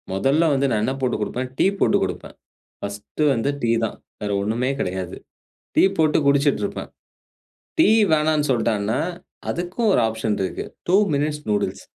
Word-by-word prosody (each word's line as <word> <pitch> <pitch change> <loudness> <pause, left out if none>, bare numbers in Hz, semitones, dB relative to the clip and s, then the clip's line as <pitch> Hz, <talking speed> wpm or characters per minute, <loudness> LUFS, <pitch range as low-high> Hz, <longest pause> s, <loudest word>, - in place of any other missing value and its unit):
மொதல்ல 135 - +2
வந்து 140 0 +2
நான் 110 -2 +1
என்ன 130 - 0
போட்டுக் 125 -4 0
குடுப்பேன். 125 +4 -3
டீ - - +3
போட்டு - - +4
குடுப்பேன். - - -5 0.5
பர்ஸ்ட் 100 +8 -6
வந்து 120 +2 0
டீ 115 - +1
தான். 110 - -6 0.2
வேற 105 -1 -2
ஒண்ணுமே 115 +5 0
கெடையாது. 90 -1 -3 0.6
டீ - - +5
போட்டு 155 -1 +3
குடிச்சிட்டுருப்பேன். 140 0 +1 0.9
டீ 320 - +6 0.2
வேணான்னு 155 -1 +2
சொல்ட்டான்னா, 115 -1 0 0.5
அதுக்கும் 180 +6 -1
ஒரு - - +4
ஆப்ஷன் 110 -1 -2
இருக்கு. 95 - -4 0.2
2 185 - +5 0.2
மினிட்ஸ் 150 +1 -1
நூடில்ஸ் 105 -1 -1
125 Hz, 145 wpm, -22 LUFS, 105-150 Hz, 0.9 s, டீ